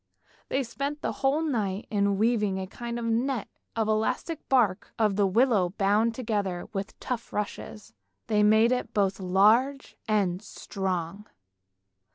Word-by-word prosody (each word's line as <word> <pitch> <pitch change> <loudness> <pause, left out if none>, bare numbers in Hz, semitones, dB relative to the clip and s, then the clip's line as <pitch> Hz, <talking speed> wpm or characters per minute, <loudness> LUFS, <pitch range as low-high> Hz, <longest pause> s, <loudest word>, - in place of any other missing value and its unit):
They 270 - 0
spent 280 +5 -4
the - - 0
whole 275 +4 +1
night 215 -9 -1
in 200 -1 +1
weaving 210 -3 +1
a 190 - -3
kind 235 +5 -6
of 235 - -4
net 235 +1 0 0.3
of 225 -1 +1
the 215 - +1
elastic 275 +8 -2
bark 220 -7 +2
of 215 -3 +2
the 200 -1 +3
willow 200 -3 +2
bound 215 +3 +2
together 205 -7 -2
with 195 0 -5
tough 240 -2 -4
rushes; 210 +1 -5 0.3
they 210 -2 +2
made 220 +3 +5
it 255 - -2
both 195 -2 +1
large 215 +9 +3
and 195 -4 +1
strong. 190 -2 -4
215 Hz, 150 wpm, -27 LUFS, 195-235 Hz, 0.3 s, made